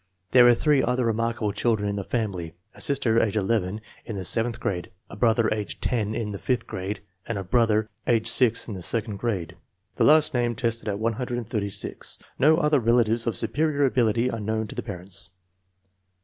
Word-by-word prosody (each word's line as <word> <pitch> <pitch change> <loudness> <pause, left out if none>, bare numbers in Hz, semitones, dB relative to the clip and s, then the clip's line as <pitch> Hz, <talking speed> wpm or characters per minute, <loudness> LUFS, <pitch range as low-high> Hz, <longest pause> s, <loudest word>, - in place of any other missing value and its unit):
There 125 -1 +7
are 120 - +7
three 145 +1 +3
other 125 0 0
remarka 115 +1 -1
ble 105 -1 +1
children 105 0 0
in 100 - -1
the 100 - -3
family; 95 -8 -3 0.2
a - - -12
sister, 115 -5 +2
age 110 -1 0
11, 105 0 0 0.2
in 115 - -6
the 95 -2 -4
sev 115 +5 +2
enth 115 - -6
grade; 90 -2 -3 0.2
a - - -7
brother, 115 -1 +3
age 105 -1 -5
10, 110 -3 -1
in 110 -2 -3
the 100 - -6
fifth 125 -3 -1
grade; 95 0 -5 0.3
and 115 - -2
a 100 - -3
brother, 110 +1 +2 0.2
age 115 -2 +2
6, 115 0 +2
in 110 - -5
the 95 - -6
second 110 +2 -1
grade. 95 -7 -3 0.4
The - - +3
last 155 0 +5
named 120 -2 0
tested 115 -1 -1
at 100 -1 -1
136. 115 -3 -2 0.2
No 155 +4 +5
other 150 -3 +3
relatives 115 0 +2
of 115 - 0
superior 145 +5 +1
ability 120 -2 +2
are 115 - -4
known 110 +1 -1
to - - -6
the 125 - -3
parents. 95 -4 -6
115 Hz, 195 wpm, -25 LUFS, 105-120 Hz, 0.4 s, There